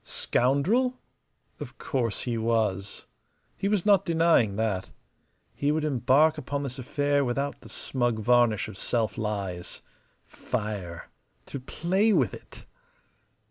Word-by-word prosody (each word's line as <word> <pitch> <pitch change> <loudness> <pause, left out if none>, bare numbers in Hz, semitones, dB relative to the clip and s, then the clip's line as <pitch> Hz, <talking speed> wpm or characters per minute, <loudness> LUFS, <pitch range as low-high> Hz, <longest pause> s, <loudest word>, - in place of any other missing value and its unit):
Scoundrel? 200 - +1 0.6
Of - - -8
course 120 -6 -2
he 120 -2 -2
was. 110 -4 -1 0.5
He 195 - -2
was 205 -3 +1
not 200 -3 +5
denying 165 - +3
that. 100 -3 -1 0.6
He 145 +1 0
would 155 0 0
embark 150 +3 +3
upon 140 +1 -3
this 135 -1 -5
affair 145 +2 +1
without 140 +3 -2
the - - -13
smug 120 -3 -1
varnish 120 -1 +3
of - - -9
self 115 -3 0
lies. 100 -6 -4 0.4
Fire 100 -6 -5 0.3
to 140 - -6
play 185 - +1
with - - +2
it! - - -12
130 Hz, 125 wpm, -27 LUFS, 110-155 Hz, 0.6 s, not